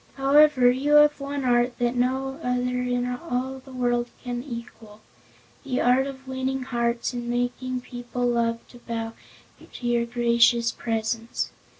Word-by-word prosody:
However, 275 Hz, -2 st, +5 dB
you 275 Hz, +4 st, 0 dB
have 295 Hz, 0 st, +6 dB
one 280 Hz, -1 st, -4 dB
art 245 Hz, 0 st, +2 dB
that 240 Hz, 0 st, +1 dB
no 265 Hz, +3 st, -1 dB
other 250 Hz, -1 st, -1 dB
in 245 Hz, 0 st, 0 dB
all 255 Hz, 0 st, -3 dB
the 265 Hz, +1 st, -15 dB
world 245 Hz, -1 st, 0 dB
can 245 Hz, -1 st, -3 dB
equal 230 Hz, -4 st, -9 dB, 0.6 s
the 255 Hz, -2 st, -2 dB
art 255 Hz, +2 st, +3 dB
of 270 Hz, -1 st, -9 dB
winning 260 Hz, 0 st, -2 dB
hearts 235 Hz, -1 st, -1 dB
and 240 Hz, -1 st, -4 dB
making 245 Hz, +1 st, -2 dB
people 245 Hz, 0 st, -4 dB
love 230 Hz, -1 st, 0 dB
to 245 Hz, -, -14 dB
bow 225 Hz, -1 st, -4 dB, 0.5 s
to 245 Hz, -, -8 dB
your 235 Hz, -1 st, +1 dB
gracious 235 Hz, 0 st, +3 dB
presence. 225 Hz, 0 st, -2 dB
245 Hz, 150 wpm, -25 LUFS, 240-260 Hz, 0.6 s, have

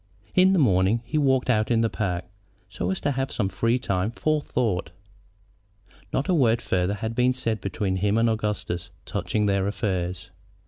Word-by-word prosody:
In 185 Hz, 0 st, +5 dB
the -, -, +3 dB
morning 105 Hz, -, +3 dB
he 155 Hz, +5 st, -1 dB
walked 130 Hz, -3 st, +2 dB
out 110 Hz, -4 st, +2 dB
in 115 Hz, -2 st, +3 dB
the 115 Hz, -, +3 dB
park, 90 Hz, -4 st, -2 dB, 0.4 s
so 90 Hz, -, -3 dB
as 95 Hz, -, -1 dB
to 145 Hz, -, +1 dB
have 135 Hz, 0 st, -1 dB
free 115 Hz, +2 st, 0 dB
time 100 Hz, -4 st, -1 dB
for 155 Hz, +5 st, 0 dB
thought. 110 Hz, -10 st, -1 dB, 1.2 s
Not 135 Hz, -, -1 dB
a 185 Hz, -, +2 dB
word 120 Hz, -8 st, +3 dB
farther 90 Hz, +2 st, 0 dB
had 110 Hz, +3 st, -4 dB
been 125 Hz, +2 st, +2 dB
said 115 Hz, -5 st, -2 dB
between 95 Hz, -1 st, -2 dB
him 100 Hz, +3 st, +1 dB
and 115 Hz, +1 st, +3 dB
Augustus 105 Hz, -6 st, -2 dB, 0.2 s
touching 105 Hz, -1 st, -1 dB
their 100 Hz, -1 st, +1 dB
affairs. 95 Hz, -3 st, -2 dB
110 Hz, 175 wpm, -25 LUFS, 95-125 Hz, 1.2 s, In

